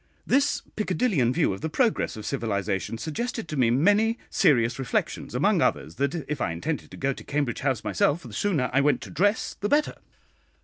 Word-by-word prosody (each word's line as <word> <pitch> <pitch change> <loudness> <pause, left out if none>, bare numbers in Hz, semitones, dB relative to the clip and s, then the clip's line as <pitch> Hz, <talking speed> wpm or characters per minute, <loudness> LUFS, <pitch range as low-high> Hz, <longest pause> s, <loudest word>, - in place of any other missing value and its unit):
This 275 +2 +2
Piccadillean 190 - +1
view 155 - +1
of 95 - -8
the 160 - -2
progress 230 - 0
of 105 - -7
civilisation 105 -4 -2
suggested 225 - -4
to 155 - -5
me 125 -4 +3
many 205 - +3
serious 120 -3 +3
reflections; 135 - -2
among - - +3
others, 80 - 0
that 140 +3 0
if 150 -2 -3
I - - +1
intended 140 - -4
to - - -11
go 135 0 0
to - - -11
Cambridge 140 -5 -1
House 130 -5 -1
myself, 160 +4 +1
the 120 -4 -10
sooner 150 - 0
I 135 - +4
went 145 +1 +2
to - - -9
dress 205 +6 +1
the 205 - -1
better. 295 +1 +2
145 Hz, 190 wpm, -26 LUFS, -, -, I